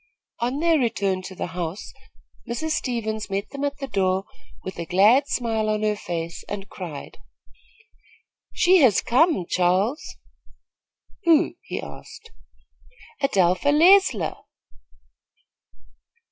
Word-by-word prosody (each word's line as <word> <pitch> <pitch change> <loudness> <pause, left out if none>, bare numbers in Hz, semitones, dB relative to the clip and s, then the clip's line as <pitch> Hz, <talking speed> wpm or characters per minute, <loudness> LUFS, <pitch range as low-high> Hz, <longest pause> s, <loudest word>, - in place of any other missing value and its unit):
On 250 +4 -1
their 330 -2 +3
return 200 -6 0
to 185 0 -9
the - - -3
house, 175 +2 -6 0.6
Mrs. 315 +7 -3
Stevens 225 -7 -2
met 195 +1 -3
them 280 0 -5
at 285 0 -2
the 280 - -5
door 190 -3 0 0.4
with 190 - -7
a 170 - -3
glad 215 - +4
smile 225 -5 -1
on 215 0 -1
her 210 0 +1
face, 170 -4 -5
and 200 -1 -5
cried: 170 -8 -9 1.3
"She 370 +2 +4
has 255 - +5
come, 260 - +2
Charles." 185 - +1 1.2
"Who?" 330 0 +4
he - - -5
asked. 460 - -11 0.9
"Adelpha 195 0 +2
Leisler." 370 +6 +4
215 Hz, 115 wpm, -23 LUFS, 185-285 Hz, 1.3 s, has